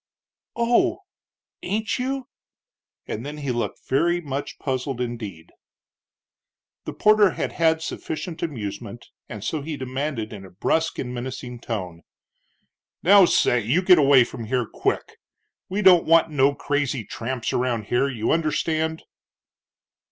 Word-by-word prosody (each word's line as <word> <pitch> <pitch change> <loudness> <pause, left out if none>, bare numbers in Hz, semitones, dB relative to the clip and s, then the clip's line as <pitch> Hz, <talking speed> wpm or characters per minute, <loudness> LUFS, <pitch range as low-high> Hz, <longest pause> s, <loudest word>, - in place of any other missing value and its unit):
"Oh, 335 +10 +2 0.6
ain't 215 +4 -2
you?" 265 0 -2 0.8
and 110 - -4
then 145 +2 -6
he 140 -3 -3
looked 120 -4 -4
very 170 +6 +2
much 140 -3 -5
puzzled 130 -1 -3
indeed. 110 -9 -5 1.3
The - - -5
porter 210 -2 +5
had - - -2
had 160 -1 +2
sufficient 160 +1 -5
amusement, 115 -6 -5 0.2
and 105 -3 -7
so 155 +4 -2
he 150 +1 -5
demanded, 130 -3 -3
in 100 -2 -9
a 95 - -11
brusque 160 - 0
and 125 -1 -4
menacing 125 0 -6
tone, 90 -8 -5 1.0
"Now, 195 +2 +8
say 125 -7 +3
you 125 - +1
get 180 -2 +7
away 135 -3 +6
from 120 -1 -7
here 125 +1 0
quick! - - -2 0.5
We 200 +3 -1
don't 180 -3 +7
want 165 0 +5
no 140 -1 +3
crazy 145 -5 -1
tramps 120 0 -4
around 120 -3 0
here. 120 +6 +1
You 115 -4 -1
understand?" 160 0 0
140 Hz, 135 wpm, -24 LUFS, 120-165 Hz, 1.3 s, Now